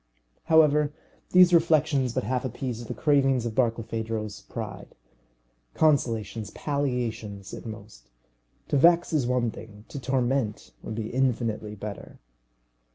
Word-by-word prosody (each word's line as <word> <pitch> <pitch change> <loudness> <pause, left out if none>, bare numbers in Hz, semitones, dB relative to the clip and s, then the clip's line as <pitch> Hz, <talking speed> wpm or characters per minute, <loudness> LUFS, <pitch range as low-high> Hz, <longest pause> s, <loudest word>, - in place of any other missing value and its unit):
However, 150 -2 +4 0.4
these 180 -1 +6
reflections 155 -6 +3
but 130 - 0
half 125 -1 -1
appeased 120 -2 -4
the - - -5
cravings 135 -5 +2
of 115 - -3
Barkilphedro's 115 -3 -2
pride. - - -8 0.8
Consolations, 115 -8 +1
palliations 120 -8 -3
at - - -7
most. 105 - -11 0.6
To 145 - +2
vex 170 +4 +4
is 140 -6 +1
one 125 -2 +1
thing; 105 -1 -12
to 140 - -6
torment 125 -3 -1
would 110 - -6
be 110 -1 -4
infinitely 115 -5 -1
better. 105 -1 -8
125 Hz, 120 wpm, -26 LUFS, 110-140 Hz, 0.8 s, these